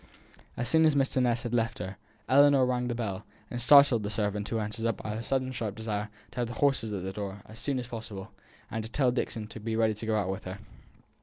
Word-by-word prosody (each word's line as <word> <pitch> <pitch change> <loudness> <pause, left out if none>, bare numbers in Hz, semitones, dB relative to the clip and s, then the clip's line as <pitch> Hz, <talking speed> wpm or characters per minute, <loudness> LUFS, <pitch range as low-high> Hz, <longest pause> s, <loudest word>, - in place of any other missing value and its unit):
As 120 - -1
soon 160 0 +5
as 155 -2 +4
Mr. 135 -1 +2
Ness 120 -1 +1
had 120 -1 -4
left 115 -1 +1
her, 95 +2 -5 0.3
Ellinor 140 -1 +6
rang 125 -1 0
the 120 - -2
bell, 105 -5 -3 0.3
and 120 - -3
startled 140 -3 +7
the 100 - -3
servant 105 -1 -1
who 115 - -1
answered 110 +1 -3
it 115 - 0
by 105 - -5
her 110 - -3
sudden 130 +2 -1
sharp 110 -5 -3
desire 110 -1 -3 0.2
to - - -7
have 120 - 0
the 120 - -7
horses 135 -5 +2
at 100 -3 -3
the 95 0 -4
door 100 -1 -6
as 110 +1 -10
soon 140 -2 0
as 125 - -3
possible, 110 -5 -7 0.4
and 110 0 -2
to 110 - -7
tell 130 0 +2
Dixon 115 -3 -2
to 115 - -8
be 110 +1 -3
ready 110 -1 +3
to 110 +2 -7
go 110 - +2
out 95 -2 0
with 95 - -6
her. 95 +1 -5
115 Hz, 250 wpm, -29 LUFS, 105-125 Hz, 0.4 s, startled